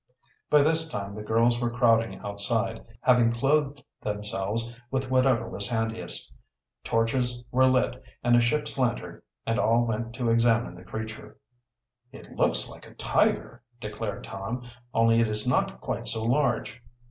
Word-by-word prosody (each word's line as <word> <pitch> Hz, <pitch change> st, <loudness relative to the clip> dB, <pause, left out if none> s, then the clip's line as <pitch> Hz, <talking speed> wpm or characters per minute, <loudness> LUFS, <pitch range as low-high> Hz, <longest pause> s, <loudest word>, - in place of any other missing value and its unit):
By 150 Hz, -1 st, +6 dB
this 160 Hz, +1 st, +3 dB
time 100 Hz, -4 st, -5 dB
the 105 Hz, -, -7 dB
girls 115 Hz, +3 st, +2 dB
were 120 Hz, -, +1 dB
crowding 115 Hz, -2 st, +2 dB
outside, 110 Hz, +3 st, -1 dB, 0.2 s
having 125 Hz, -2 st, +4 dB
clothed 140 Hz, +3 st, 0 dB, 0.2 s
themselves 105 Hz, +2 st, -2 dB, 0.2 s
with 130 Hz, 0 st, -2 dB
whatever 130 Hz, -2 st, +3 dB
was 100 Hz, +2 st, -1 dB
handiest. 115 Hz, -1 st, -2 dB, 0.5 s
Torches 120 Hz, +1 st, 0 dB
were 130 Hz, +1 st, +4 dB
lit, 130 Hz, 0 st, +1 dB, 0.2 s
and 120 Hz, 0 st, +4 dB
a 120 Hz, -, +5 dB
ship's 150 Hz, +4 st, 0 dB
lantern, 120 Hz, -2 st, -1 dB, 0.2 s
and 115 Hz, +1 st, 0 dB
all 115 Hz, +2 st, +3 dB
went 115 Hz, 0 st, -3 dB
to 120 Hz, -1 st, 0 dB
examine 115 Hz, -1 st, +2 dB
the 90 Hz, 0 st, -13 dB
creature. 110 Hz, +3 st, -7 dB, 0.7 s
"It -, -, -13 dB
looks -, -, +1 dB
like -, -, -12 dB
a -, -, -16 dB
tiger," -, -, 0 dB, 0.2 s
declared 105 Hz, -1 st, -5 dB
Tom. 110 Hz, +5 st, -5 dB, 0.3 s
"Only 115 Hz, 0 st, +4 dB
it 115 Hz, -, +3 dB
is 105 Hz, +2 st, +2 dB
not 125 Hz, -, +1 dB
quite -, -, -3 dB
so 110 Hz, -1 st, 0 dB
large." 120 Hz, -2 st, 0 dB
115 Hz, 150 wpm, -27 LUFS, 110-125 Hz, 0.7 s, By